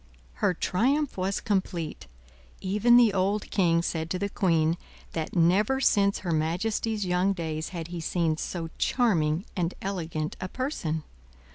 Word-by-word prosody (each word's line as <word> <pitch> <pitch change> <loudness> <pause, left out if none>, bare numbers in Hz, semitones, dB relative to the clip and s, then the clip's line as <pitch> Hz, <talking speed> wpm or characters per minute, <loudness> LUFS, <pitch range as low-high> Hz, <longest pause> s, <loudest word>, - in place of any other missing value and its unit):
Her 180 - +3
triumph 270 - +1
was 190 +1 -1
complete; 185 -6 -2 0.5
even 210 +5 +4
the 235 -4 +6
old 200 +2 0
king 170 -4 +3
said 160 -1 -2
to 185 - -1
the 200 +2 -2
queen, 165 -4 +2 0.4
that 160 -1 -3
never 195 +10 +3
since 200 -6 +3
her 175 - 0
majesty's 195 +7 0
young 180 +2 +2
days 160 -3 -3
had 170 -2 -6
he 175 -1 -5
seen 165 -1 0
so 165 -1 -4
charming 175 -8 +2
and 175 -2 -1
elegant 165 -5 -3
a 185 - -2
person. 180 - -3
180 Hz, 145 wpm, -27 LUFS, 165-205 Hz, 0.5 s, the